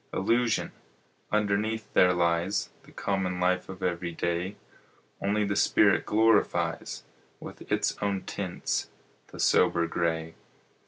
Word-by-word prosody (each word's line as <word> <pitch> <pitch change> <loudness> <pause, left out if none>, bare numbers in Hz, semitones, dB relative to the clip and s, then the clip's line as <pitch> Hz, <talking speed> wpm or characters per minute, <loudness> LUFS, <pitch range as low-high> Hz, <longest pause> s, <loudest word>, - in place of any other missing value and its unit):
Illusion! 115 +3 +1 0.6
Underneath 105 +1 0
there 90 - +5
lies 85 +3 0
The - - -17
common 95 -2 -2
life 90 0 +1
of 95 -1 -8
every 85 -1 -1
day; 85 +4 -2 0.7
Only 105 +1 +1
the 100 0 -1
spirit - - +3
glorifies 110 0 +1 0.4
With - - -11
its - - +1
own 100 -2 -1
tints 95 -3 -3 0.4
the - - -12
sober 85 0 +3
gray. 80 -1 -2
95 Hz, 115 wpm, -28 LUFS, 85-105 Hz, 0.7 s, there